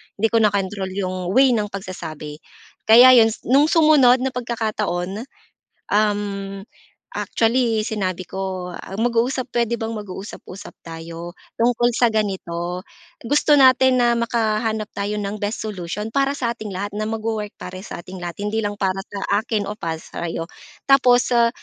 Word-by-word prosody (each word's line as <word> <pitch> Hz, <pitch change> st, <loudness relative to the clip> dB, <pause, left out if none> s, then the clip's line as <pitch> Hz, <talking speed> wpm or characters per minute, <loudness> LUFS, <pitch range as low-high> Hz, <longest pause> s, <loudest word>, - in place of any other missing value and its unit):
Hindi 220 Hz, +3 st, +2 dB
ko 230 Hz, -, +3 dB
nakontrol 200 Hz, -2 st, 0 dB
'yong 185 Hz, -2 st, -3 dB
way 265 Hz, 0 st, +6 dB
ng 215 Hz, -3 st, +1 dB
pagsasabi. 165 Hz, -6 st, -7 dB, 0.5 s
Kaya 245 Hz, +3 st, +9 dB
'yon 225 Hz, -, +6 dB
s, -, -, -23 dB
no'ng 280 Hz, +4 st, +4 dB
sumunod 295 Hz, -7 st, +5 dB
na 265 Hz, -, 0 dB
pagkakataon, 215 Hz, -5 st, -2 dB, 0.7 s
uhm, 205 Hz, -2 st, 0 dB, 0.6 s
actually 230 Hz, -1 st, +1 dB
sinabi 185 Hz, -4 st, -2 dB
ko, 190 Hz, -1 st, -4 dB
ah, -, -, -10 dB
mag-uusap 245 Hz, +2 st, 0 dB
puwede 235 Hz, -1 st, -1 dB
bang 225 Hz, 0 st, -3 dB
mag-uusap-usap 195 Hz, -1 st, -9 dB
tayo 165 Hz, +1 st, -8 dB, 0.2 s
tungkol 240 Hz, +1 st, +2 dB
sa 235 Hz, -2 st, +3 dB
ganito. 180 Hz, -4 st, -2 dB, 0.4 s
Gusto 290 Hz, +3 st, +3 dB
natin 260 Hz, -1 st, +6 dB
na 240 Hz, -1 st, +3 dB
makahanap 220 Hz, -2 st, -1 dB
tayo 205 Hz, +1 st, -3 dB
ng 205 Hz, 0 st, -4 dB
best 205 Hz, +2 st, -3 dB
solution 210 Hz, +1 st, -5 dB
para 275 Hz, +1 st, +1 dB
sa 235 Hz, -2 st, -1 dB
ating 220 Hz, -2 st, -8 dB
lahat 200 Hz, +2 st, -4 dB
na 215 Hz, +1 st, -3 dB
magwo-work 220 Hz, -1 st, -3 dB
para 185 Hz, +1 st, -8 dB
sa 170 Hz, -4 st, -8 dB
ating 185 Hz, 0 st, -9 dB
lahat 175 Hz, -1 st, -5 dB
hindi 220 Hz, +2 st, -1 dB
lang 205 Hz, -1 st, -3 dB
para 195 Hz, -1 st, -1 dB
sa 200 Hz, 0 st, -1 dB
akin 220 Hz, -2 st, -2 dB
o 205 Hz, -, -4 dB
para 165 Hz, -6 st, -4 dB
sa'yo. 165 Hz, +1 st, -5 dB, 0.4 s
Tapos, 250 Hz, -3 st, +4 dB
se 235 Hz, -1 st, +5 dB
210 Hz, 155 wpm, -21 LUFS, 190-235 Hz, 0.7 s, Kaya